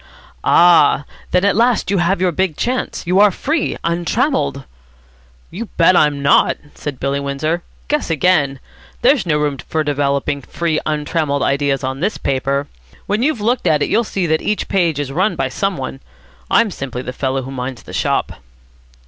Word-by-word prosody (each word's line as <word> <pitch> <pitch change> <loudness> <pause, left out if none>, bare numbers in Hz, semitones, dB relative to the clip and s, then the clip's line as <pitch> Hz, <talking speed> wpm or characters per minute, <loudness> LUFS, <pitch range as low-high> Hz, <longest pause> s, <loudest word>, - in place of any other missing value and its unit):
"Ah! 165 -4 +5 0.2
then 180 +2 +2
at 200 - +3
last 235 -1 +2
you 200 - +2
have 175 +2 +1
your 185 -1 +2
big 185 -2 -1
chance. 250 -4 -2
You 180 +3 +2
are 210 0 +7
free, 295 - -2
untrammelled." 170 - 0 0.9
"You 210 +7 -5
bet 180 +2 +5
I'm 145 -3 +2
not," 140 - +4 0.2
said 145 -4 -6
Billy 140 +1 -1
Windsor. 140 +5 -2 0.3
"Guess 300 -7 -1
again. 150 -4 +2 0.4
There's 255 -6 +3
no 150 -3 +2
room 145 -2 -1
for 155 +5 -2
developing 140 -1 -1
free 160 +3 -2
untrammelled 150 -1 -1
ideas 140 -1 0
on 130 +1 -3
this 200 +7 -1
paper. 140 +1 -1 0.4
When 210 +3 -1
you've 265 -4 0
looked 235 -2 0
at 150 -3 +3
it, - - -2
you'll 230 +3 +2
see 195 -4 -2
that 160 -1 +1
each 210 - -1
page 170 -6 +1
is 140 -2 -3
run 185 +9 +1
by - - -1
some 195 -3 -2
one. 135 0 -5 0.5
I'm 220 - +3
simply 130 -5 -5
the 125 - -5
fellow 130 0 -2
who 135 - -7
minds 125 -2 -5
the - - -11
shop." - - -1
155 Hz, 175 wpm, -18 LUFS, 140-195 Hz, 0.9 s, are